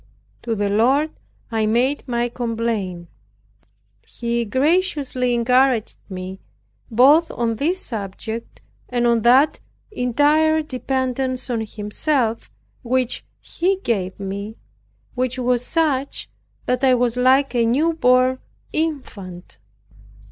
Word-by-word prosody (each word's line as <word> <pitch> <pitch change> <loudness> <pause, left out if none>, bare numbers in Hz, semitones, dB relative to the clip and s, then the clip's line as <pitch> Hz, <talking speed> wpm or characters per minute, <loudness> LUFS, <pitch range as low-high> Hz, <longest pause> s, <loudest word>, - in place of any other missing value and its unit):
To 230 -2 -2
the 205 -1 0
Lord 260 +9 +2 0.4
I 220 -1 +1
made 255 +7 +1
my 240 -1 0
complaint; 225 -7 -3 1.0
He 235 0 -3
graciously 270 - +1
encouraged 250 -1 +2
me, 185 0 -6 0.5
both 280 +8 +5
on 230 -2 -2
this 345 - 0
subject 220 +1 -6 0.3
and 240 -1 0
on 235 -1 +3
that 260 +6 +4 0.3
entire 305 - +2
dependence 260 -1 -2
on 230 -2 -1
Himself 225 +3 -2 0.3
which 255 0 -1 0.2
He 375 +3 -1
gave 195 -5 -1
me, 200 +2 -5 0.6
which 255 0 -1
was 250 -1 +1
such 285 -2 -1 0.3
that 250 +1 -1
I 260 -1 +5
was 245 -1 +1
like 260 +2 +3
a 240 -1 +2
new 285 +9 +2
born 255 -3 +3 0.3
infant. 205 - -4
250 Hz, 110 wpm, -21 LUFS, 225-270 Hz, 1.0 s, both